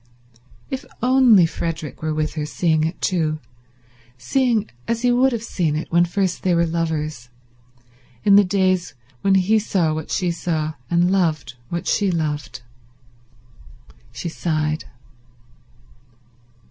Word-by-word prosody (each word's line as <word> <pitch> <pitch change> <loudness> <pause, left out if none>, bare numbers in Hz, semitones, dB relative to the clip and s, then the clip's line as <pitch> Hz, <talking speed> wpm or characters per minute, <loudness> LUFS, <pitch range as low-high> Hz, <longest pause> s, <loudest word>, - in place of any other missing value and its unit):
If 265 +1 -3 0.2
only 250 -7 +6
Frederick 165 -2 -4
were 155 0 -1
with 155 0 -1
her, 155 - -3
seeing 155 +1 +1
it 165 +3 -4
too, 160 -4 0 0.8
seeing 225 - +1 0.2
as 230 +1 -1
he 245 - +4
would 255 +2 +3
have 230 -2 -3
seen 170 -9 -1
it 155 - -4
when 170 +1 +4
first 185 +1 -1
they 180 -2 +2
were 170 0 +3
lovers, 155 -6 -3 0.9
in 200 -1 +6
the 205 - +7
days 185 -4 0 0.3
when 195 -1 +3
he 195 +4 +3
saw 180 -6 0
what 155 0 -5
she 180 -2 0
saw 160 -2 -2 0.2
and 175 +1 +2
loved 160 -11 0 0.2
what 170 -1 -3
she 205 -2 +2
loved... 150 -6 -3 1.5
She 125 +9 -6
sighed. 155 -2 -2
170 Hz, 135 wpm, -21 LUFS, 155-195 Hz, 1.5 s, the